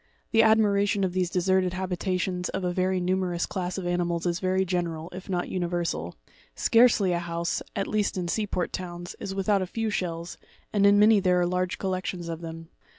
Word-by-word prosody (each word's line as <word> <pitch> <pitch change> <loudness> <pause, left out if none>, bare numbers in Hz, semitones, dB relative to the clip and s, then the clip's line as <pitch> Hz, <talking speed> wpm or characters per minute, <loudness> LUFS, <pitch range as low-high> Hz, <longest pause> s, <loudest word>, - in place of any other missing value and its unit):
The 225 - +5
admiration 205 -2 +3
of 185 -2 0
these 185 -2 0
deserted 185 0 +1
habitations 185 0 -2
of 190 - -3
a 180 -1 0
very 185 +1 +1
numerous 180 -1 0
class 180 -1 -4
of 190 - -4
animals 175 -1 -1
is 170 -1 0
very 190 0 +1
general, 170 -2 -2
if 185 +1 -9
not 180 -2 -1
universal; 170 - -2 0.4
scarcely 225 -5 +4
a 170 - 0
house, 170 0 -2
at 195 - 0
least 210 -2 0
in 180 -1 -2
sea 210 +4 -1
port 180 -2 -2
towns, 175 -1 -6
is 195 - -5
without 195 0 +2
a 185 - -2
few 225 +3 -2
shells, 170 -3 -3 0.3
and 200 -1 +4
in 200 0 +6
many 210 0 +6
there 180 -2 +3
are 175 - +2
large 180 +1 -1
collections 185 -2 -3
of 165 0 -5
them. 165 0 -8
185 Hz, 195 wpm, -27 LUFS, 175-195 Hz, 0.4 s, in